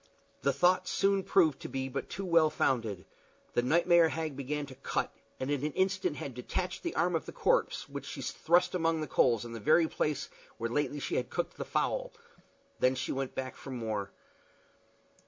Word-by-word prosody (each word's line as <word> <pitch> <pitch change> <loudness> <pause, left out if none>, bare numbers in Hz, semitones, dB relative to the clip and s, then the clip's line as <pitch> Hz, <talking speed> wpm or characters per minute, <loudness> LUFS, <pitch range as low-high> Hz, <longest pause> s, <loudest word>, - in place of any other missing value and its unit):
The 140 - +3
thought 180 +7 +3
soon 195 0 +2
proved 160 -9 +3
to - - -7
be 135 0 -2
but 135 +1 -4
too 195 +2 -4
well 165 -3 +5
founded. 115 -10 0 0.5
The - - +3
nightmare 170 +5 +5
hag 160 -3 -3
began 145 +2 -3
to 135 - -11
cut, 135 - -2 0.3
and 130 +2 -2
in 145 -1 0
an 150 -1 -1
instant 190 -3 +1
had 135 -1 -5
detached 180 +9 -3
the 340 -2 -3
arm 175 0 +2
of 160 - -2
the - - -5
corpse, - - +1
which - - -7
she - - -6
thrust 175 +2 +2
among 165 -2 +1
the 155 - -3
coals 120 -4 +3
in 120 - -7
the 115 - -5
very 160 +8 +4
place 145 -3 -1 0.3
where 115 +1 -3
lately 145 +2 0
she - - -2
had 125 0 -1
cooked 175 - -2
the - - -5
fowl. - - -1 0.7
Then 130 +1 +3
she 130 +1 -2
went 135 -1 -3
back 130 -1 -4
for - - -10
more. 110 -6 -3
145 Hz, 195 wpm, -31 LUFS, 130-175 Hz, 0.7 s, well